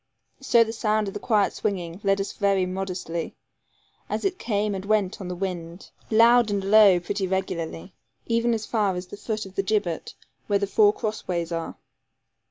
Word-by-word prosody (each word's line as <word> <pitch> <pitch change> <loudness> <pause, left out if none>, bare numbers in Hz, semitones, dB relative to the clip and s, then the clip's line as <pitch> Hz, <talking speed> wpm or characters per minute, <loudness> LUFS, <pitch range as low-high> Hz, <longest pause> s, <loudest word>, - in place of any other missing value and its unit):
So 240 -4 +4
the 225 0 -5
sound 215 -1 0
of 195 - -5
the - - -5
quiet 210 -4 +2
swinging 180 -3 -3
led 195 0 +2
us 195 - -2
very 195 -2 +1
modestly, 180 -3 -4 0.7
as - - -2
it 375 -1 -1
came 210 -2 -1
and 190 -1 -4
went 205 -1 0
on 185 - -5
the 180 - -4
wind, 175 -2 -5 0.2
loud 230 +1 +5
and 200 -1 -1
low 200 -2 +6
pretty 195 +2 -3
regularly, 170 - -3 0.3
even 230 0 +1
as 220 -1 -4
far 210 -5 0
as 180 +1 -5
the 180 - -10
foot 215 0 -4
of 190 - -12
the 195 - 0
gibbet 195 -4 -2 0.3
where 205 - +3
the 200 - 0
four 205 +1 +4
cross 215 0 -5
ways 170 -2 -2
are. 165 -1 -4
200 Hz, 185 wpm, -25 LUFS, 185-215 Hz, 0.7 s, low